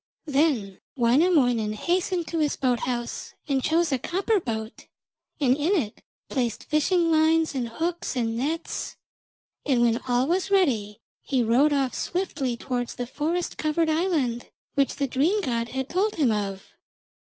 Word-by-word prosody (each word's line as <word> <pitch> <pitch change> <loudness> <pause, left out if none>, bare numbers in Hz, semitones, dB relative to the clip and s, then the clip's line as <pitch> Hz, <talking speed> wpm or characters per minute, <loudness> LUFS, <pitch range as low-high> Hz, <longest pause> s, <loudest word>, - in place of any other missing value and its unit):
Then 275 - +1 0.2
Wainamoinen 245 -4 +3
hastened 350 - -1
to 330 - -2
his 300 -2 +1
boat 250 -3 +1
house, 240 -1 -4
and 275 -2 +1
chose 330 0 +2
a 265 - +1
copper 390 - 0
boat, 220 -7 -5 0.5
and 260 -3 +3
in 305 +7 +1
it 225 - -2 0.3
placed 240 -5 -2
fishing 330 +2 +2
lines 320 0 +3
and 250 -4 -2
hooks 335 +5 -3
and 230 -2 -1
nets, 310 +7 -3 0.7
and 255 -5 +2
when 235 0 +2
all 245 +1 +2
was 360 +5 0
ready 235 - +1 0.2
he 260 -4 0
rowed 250 +7 +4
off 275 -3 +1
swiftly 285 -9 -2
towards 245 -1 -3
the 245 - -3
forest 315 +7 -2
covered 315 +1 +1
island 310 -8 0 0.3
which 275 -2 +1
the 280 - 0
dream 290 - +1
god 235 -7 -1
had 265 0 -3
told 400 +6 0
him 280 -8 +2
of. 195 -2 -2
275 Hz, 155 wpm, -25 LUFS, 240-330 Hz, 0.7 s, rowed